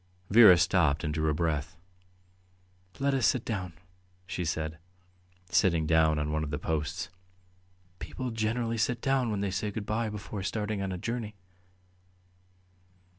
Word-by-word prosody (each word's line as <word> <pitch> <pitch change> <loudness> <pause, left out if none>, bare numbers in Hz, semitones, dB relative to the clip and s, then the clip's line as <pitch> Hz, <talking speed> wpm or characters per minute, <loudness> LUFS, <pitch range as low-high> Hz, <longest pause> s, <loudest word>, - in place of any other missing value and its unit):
Vera 105 -5 +9
stopped 85 -3 +2
and 75 -2 -1
drew 80 0 0
a - - +1
breath. 80 0 -2 1.2
"Let 140 0 +1
us 130 -4 +3
sit 130 -4 +1
down," 90 -6 -3 0.5
she 90 -1 -4
said, 80 -1 -3 0.7
sitting 85 -5 +3
down 80 -1 +3
on 75 0 -1
one 80 0 -1
of 75 - -4
the 75 - -2
posts. 80 +2 -3 0.9
"People 130 -2 -5
generally 115 +1 -1
sit 120 +2 +1
down 135 -2 +1
when 105 -2 -2
they 100 -1 -1
say 105 +2 -2
good 105 0 -5
bye 110 +2 -1
before 105 -1 -6
starting 105 +1 -2
on 95 -1 -2
a 90 - -3
journey." 115 +1 -4
95 Hz, 150 wpm, -29 LUFS, 80-110 Hz, 1.2 s, Vera